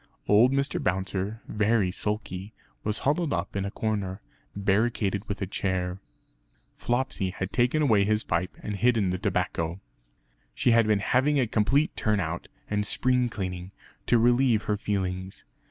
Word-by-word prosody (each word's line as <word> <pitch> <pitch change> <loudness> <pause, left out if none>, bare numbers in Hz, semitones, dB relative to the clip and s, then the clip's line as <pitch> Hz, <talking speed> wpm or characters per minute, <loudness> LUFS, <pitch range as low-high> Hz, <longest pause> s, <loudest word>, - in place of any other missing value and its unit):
Old 110 +5 +6
Mr. 140 +5 0
Bouncer, 95 +2 -1
very 105 -3 +2
sulky, 105 0 -4 0.3
was 105 0 -1
huddled 150 +2 +1
up 90 +3 -2
in 100 0 -1
a - - -2
corner, 100 -3 -2 0.4
barricaded 100 0 +1
with 100 0 -3
a - - 0
chair. 95 -1 -2 0.8
Flopsy 120 -5 -1
had 95 +1 -4
taken 125 +5 +2
away 110 -8 +4
his 105 +2 +1
pipe 85 +2 -2
and 105 -1 -3
hidden 110 -5 +2
the 90 - -2
tobacco. 90 -4 -1 0.8
She 125 - +2
had 115 -1 +4
been 105 -2 +2
having 140 +3 +3
a 130 - +3
complete 125 +8 +1
turn 105 -1 +1
out 85 -1 -3 0.2
and 105 0 0
spring 125 +3 +1
cleaning, 90 -4 -5 0.3
to 120 - +5
relieve 120 -1 +3
her 105 - 0
feelings. 95 -2 -3
105 Hz, 155 wpm, -27 LUFS, 95-120 Hz, 0.8 s, Old